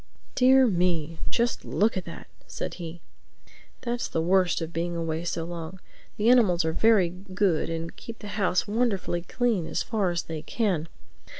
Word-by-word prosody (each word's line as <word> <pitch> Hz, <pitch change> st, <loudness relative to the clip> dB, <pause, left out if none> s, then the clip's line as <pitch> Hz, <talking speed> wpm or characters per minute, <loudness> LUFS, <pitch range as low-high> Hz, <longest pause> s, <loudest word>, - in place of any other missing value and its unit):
"Dear 260 Hz, +1 st, +6 dB
me, 170 Hz, -6 st, 0 dB
just 235 Hz, -1 st, 0 dB
look 215 Hz, +3 st, +1 dB
at 185 Hz, -, -3 dB
that!" 170 Hz, -, -9 dB, 0.2 s
said -, -, -5 dB
he. 170 Hz, 0 st, -7 dB, 0.8 s
"That's 240 Hz, 0 st, -2 dB
the -, -, -2 dB
worst 180 Hz, +2 st, +3 dB
of 165 Hz, 0 st, -5 dB
being 170 Hz, +1 st, -2 dB
away 165 Hz, -1 st, -2 dB
so 170 Hz, -1 st, -2 dB
long. 170 Hz, +1 st, -6 dB, 0.4 s
The 215 Hz, -, +1 dB
animals 185 Hz, -9 st, +4 dB
are 160 Hz, -, 0 dB
very 215 Hz, -3 st, +4 dB
good 185 Hz, -2 st, -1 dB
and 165 Hz, 0 st, -4 dB
keep 230 Hz, -1 st, -9 dB
the 205 Hz, -, -9 dB
house 195 Hz, -3 st, +1 dB
wonderfully 205 Hz, -6 st, 0 dB
clean 230 Hz, -3 st, 0 dB
as -, -, -1 dB
far 210 Hz, -5 st, 0 dB
as 175 Hz, 0 st, -1 dB
they 160 Hz, -2 st, -5 dB
can. 180 Hz, -5 st, -1 dB
180 Hz, 170 wpm, -26 LUFS, 165-220 Hz, 0.8 s, Dear